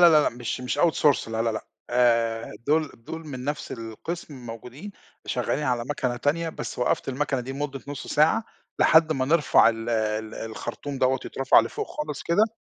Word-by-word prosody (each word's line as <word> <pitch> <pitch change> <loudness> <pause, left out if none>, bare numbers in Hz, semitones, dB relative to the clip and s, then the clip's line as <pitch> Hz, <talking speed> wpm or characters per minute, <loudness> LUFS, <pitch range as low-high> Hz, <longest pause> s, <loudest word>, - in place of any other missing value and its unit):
لا، 165 -3 +8
لأ - - +3
مش 120 +1 -4
مش 125 +3 -2
Outsource 150 -7 +3
لا، 110 0 -1
لا، 115 - +1
لأ، 110 - -5 0.2
آآ، 115 -2 +2
دول 155 0 +2
دول 160 +8 -8
من 130 -3 -6
نَفْس 145 +1 -3
القسم 125 +8 -6
موجودين 125 - -8 0.3
شغالين 150 - -1
على 125 -3 0
مَكَنة 125 -2 -2
تانية، 165 +6 0
بس - - -6
وقّفت 125 - 0
المَكَنة 135 0 -1
دي 130 +2 -6
مدة 140 -1 -4
نُص 145 -2 -6
ساعة، 160 +9 +3 0.3
لحد 160 0 +6
ما 135 -3 0
نرْفع 150 -4 +5
ال 115 0 -3
ال 110 -1 -1
الخرطوم 130 +5 -5
دوّة 130 0 +3
يتْرفع 135 -3 +4
لفوْق 115 - -4
خالص 150 -1 -5
كده 215 +6 +2
135 Hz, 175 wpm, -25 LUFS, 115-150 Hz, 0.3 s, لا